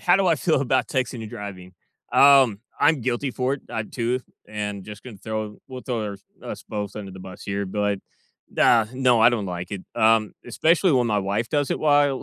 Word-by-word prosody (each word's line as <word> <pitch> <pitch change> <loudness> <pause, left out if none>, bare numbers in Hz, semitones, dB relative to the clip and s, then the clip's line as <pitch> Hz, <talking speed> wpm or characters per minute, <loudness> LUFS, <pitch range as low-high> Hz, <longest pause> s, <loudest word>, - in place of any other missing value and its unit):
how 175 0 +4
do 195 -1 +1
I 165 - +4
feel 155 -2 +1
about 130 -1 +1
texting 125 -3 -2
and 110 - -8
driving? 100 -5 -8 0.4
Um, 135 -7 +6 0.2
I'm 150 -2 +4
guilty 125 +3 -1
for 130 +2 -1
it, 140 - -11
uh 110 - -3
too, 125 +1 -1 0.3
and 105 -2 -4
just 105 -1 -10
gonna 120 -5 -9
throw 110 +1 -5
we'll 130 -1 -8
throw 110 -5 -3 0.3
us - - -7
both 105 -1 -4
under 100 -2 -6
the 95 - -10
bus 95 0 -10
here, 100 0 -3
but, 100 +3 -3
like, 105 -1 0 0.6
uh, 115 -2 +5
no, 125 -3 +3
I 115 - +7
don't 110 -5 -2
like 90 0 -5
it, 95 -2 -5
um, 110 -1 +3
especially 165 - +2
when 125 -2 +3
my 105 -2 +1
wife 100 +4 -1
does 145 -2 0
it - - 0
while 145 -3 +3
115 Hz, 210 wpm, -24 LUFS, 105-130 Hz, 0.6 s, I